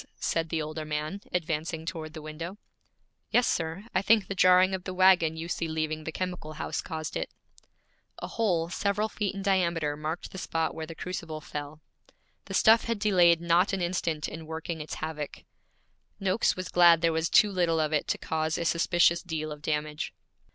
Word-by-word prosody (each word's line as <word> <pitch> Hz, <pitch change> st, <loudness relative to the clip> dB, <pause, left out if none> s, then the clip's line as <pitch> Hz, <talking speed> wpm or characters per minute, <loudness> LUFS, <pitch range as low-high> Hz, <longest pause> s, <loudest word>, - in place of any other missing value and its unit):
said 165 Hz, -1 st, -1 dB
the 160 Hz, -1 st, -1 dB
older 155 Hz, +1 st, -5 dB
man, 155 Hz, +5 st, -3 dB
advancing 160 Hz, -1 st, -2 dB
toward 160 Hz, -3 st, -5 dB
the 155 Hz, -, -8 dB
window. 165 Hz, +5 st, -6 dB, 0.7 s
'Yes, 245 Hz, -, +4 dB
sir. 165 Hz, +5 st, -2 dB
I 185 Hz, -, +2 dB
think 215 Hz, 0 st, +4 dB
the -, -, -4 dB
jarring 185 Hz, 0 st, +5 dB
of 185 Hz, -1 st, -3 dB
the 185 Hz, -1 st, -5 dB
wagon 180 Hz, -4 st, +5 dB
you 165 Hz, +1 st, -5 dB
see 170 Hz, -1 st, -2 dB
leaving 155 Hz, -1 st, -2 dB
the 160 Hz, -, -3 dB
chemical 180 Hz, -3 st, -4 dB
house 155 Hz, -, -3 dB
caused 160 Hz, -2 st, -5 dB
it.' -, -, -2 dB, 0.9 s
A -, -, -5 dB
hole 175 Hz, -7 st, 0 dB
several 200 Hz, +3 st, 0 dB
feet 205 Hz, -2 st, -2 dB
in 195 Hz, -, -5 dB
diameter 170 Hz, -6 st, +1 dB
marked 155 Hz, +3 st, -5 dB
the 190 Hz, -, -7 dB
spot 165 Hz, -2 st, -1 dB
where 160 Hz, -1 st, -6 dB
the 165 Hz, -, -8 dB
crucible 170 Hz, -4 st, -5 dB
fell. 150 Hz, 0 st, -7 dB, 0.6 s
The -, -, -5 dB
stuff 225 Hz, 0 st, +6 dB
had 230 Hz, -1 st, -1 dB
delayed 180 Hz, -5 st, +4 dB
not 170 Hz, +4 st, +3 dB
an 195 Hz, -, -1 dB
instant 165 Hz, -4 st, -1 dB
in 160 Hz, 0 st, -8 dB
working 160 Hz, 0 st, -5 dB
its 150 Hz, -, -6 dB
havoc. 155 Hz, -2 st, -5 dB, 0.8 s
Noakes 195 Hz, +2 st, +2 dB
was 185 Hz, 0 st, -5 dB
glad 170 Hz, -2 st, +6 dB
there 165 Hz, -1 st, +3 dB
was 160 Hz, +1 st, 0 dB
too 210 Hz, -, +5 dB
little 170 Hz, -4 st, +1 dB
of 155 Hz, 0 st, 0 dB
it 150 Hz, -, +1 dB
to -, -, 0 dB
cause 160 Hz, 0 st, -1 dB
a 170 Hz, -, -2 dB
suspicious 170 Hz, 0 st, +3 dB
deal 155 Hz, -3 st, -4 dB
of 150 Hz, 0 st, -8 dB
damage. 150 Hz, 0 st, -3 dB
165 Hz, 190 wpm, -28 LUFS, 155-185 Hz, 0.9 s, stuff